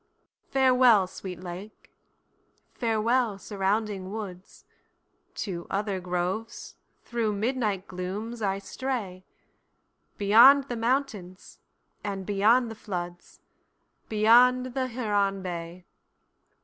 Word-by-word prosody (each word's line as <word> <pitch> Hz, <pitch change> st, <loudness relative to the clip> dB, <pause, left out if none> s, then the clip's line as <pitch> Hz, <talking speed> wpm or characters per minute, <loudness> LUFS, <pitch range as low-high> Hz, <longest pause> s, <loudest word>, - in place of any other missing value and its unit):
Farewell, 250 Hz, -6 st, +5 dB
sweet 180 Hz, -1 st, -8 dB
lake; 185 Hz, +4 st, -9 dB, 0.8 s
farewell 230 Hz, -1 st, +1 dB
surrounding 200 Hz, -1 st, -2 dB
woods, 195 Hz, -4 st, -8 dB, 0.7 s
To 175 Hz, -4 st, -5 dB
other 200 Hz, -1 st, -2 dB
groves, 180 Hz, +5 st, -4 dB, 0.3 s
through 230 Hz, -3 st, -1 dB
midnight 210 Hz, -3 st, -1 dB
glooms, 200 Hz, +6 st, -5 dB
I 195 Hz, -2 st, 0 dB
stray, 200 Hz, -4 st, -5 dB, 0.9 s
Beyond 250 Hz, +7 st, +6 dB
the 245 Hz, -, -2 dB
mountains, 225 Hz, -6 st, -3 dB, 0.4 s
and 195 Hz, -2 st, -4 dB
beyond 225 Hz, +5 st, +3 dB
the -, -, -8 dB
floods, 175 Hz, -4 st, -7 dB, 0.7 s
Beyond 245 Hz, +4 st, +4 dB
the 260 Hz, -1 st, -1 dB
Huron 205 Hz, -5 st, -1 dB
bay! 175 Hz, 0 st, -6 dB
210 Hz, 90 wpm, -27 LUFS, 190-235 Hz, 0.9 s, Beyond